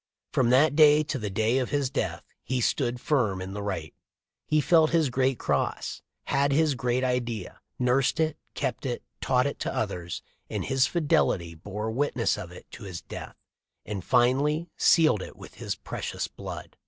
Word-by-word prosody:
From 125 -2 +2
that 145 +4 +5
day 150 -1 +7
to 145 -2 -3
the 105 -2 -3
day 110 +6 +1
of 125 - -2
his 140 -3 0
death - - -2 0.2
he 130 -1 -1
stood 125 0 0
firm 120 -10 +1
in 95 +1 -6
the 105 - -4
right. 95 -6 -4 0.5
He 155 - +3
felt 160 +1 +4
his 160 -5 +2
great 130 0 +1
cross, - - -1 0.2
had 140 0 +1
his 155 +1 +3
great 125 0 0
idea, 120 -6 -2 0.2
nursed 130 +3 +2
it, 160 -1 +1 0.2
kept 135 0 -2
it, 120 - -3 0.2
taught 125 0 +2
it 140 - -3
to - - -2
others, 90 -5 -3 0.3
in - - -2
his 130 -1 +2
fidelity 120 - +1
bore 105 +6 -5
witness 125 -1 +1
of 95 -5 -7
it 90 - -12
to - - -10
his 90 -3 -7
death, - - -8 0.5
and 100 -4 -4
finally 140 - +2
sealed 155 - +4
it - - -8
with - - -12
his - - -2
precious - - -4
blood." - - -8
125 Hz, 180 wpm, -27 LUFS, 105-145 Hz, 0.5 s, day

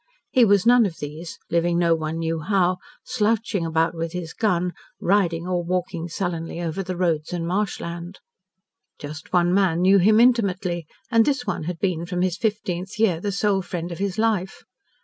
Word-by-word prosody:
He 250 -2 +5
was 205 -1 +3
none 240 -2 +6
of 170 - -8
these 155 +3 -7
living 170 +1 +2
no 170 -1 +3
one 160 0 -2
knew 165 0 -1
how, 185 +1 +1 0.3
slouching 220 -6 0
about 160 +1 +1
with 165 0 -4
his 175 -3 -5
gun, 180 -5 0 0.3
riding 175 -4 +1
or 180 -1 0
walking 175 -1 -2
sullenly 170 -1 -4
over 170 +2 -3
the 185 -1 -4
roads 165 -4 0
and 175 -2 -2
marshland. 175 -1 -3 0.8
Just 155 +2 -9
one 175 0 +3
man 185 -4 +2
knew 195 +1 +6
him 215 +4 +5
intimately, 190 -9 +2 0.2
and 230 -1 +5
this 270 -1 0
one 155 - -3
had 175 0 -3
been 170 -2 -1
from 180 -1 -1
his 185 -2 0
fifteenth 190 -4 -3
year 205 -7 +2
the 205 +3 -2
sole 200 0 +1
friend 175 -2 -5
of 170 - -6
his 195 -2 -2
life. 215 -4 0
180 Hz, 180 wpm, -23 LUFS, 170-200 Hz, 0.8 s, none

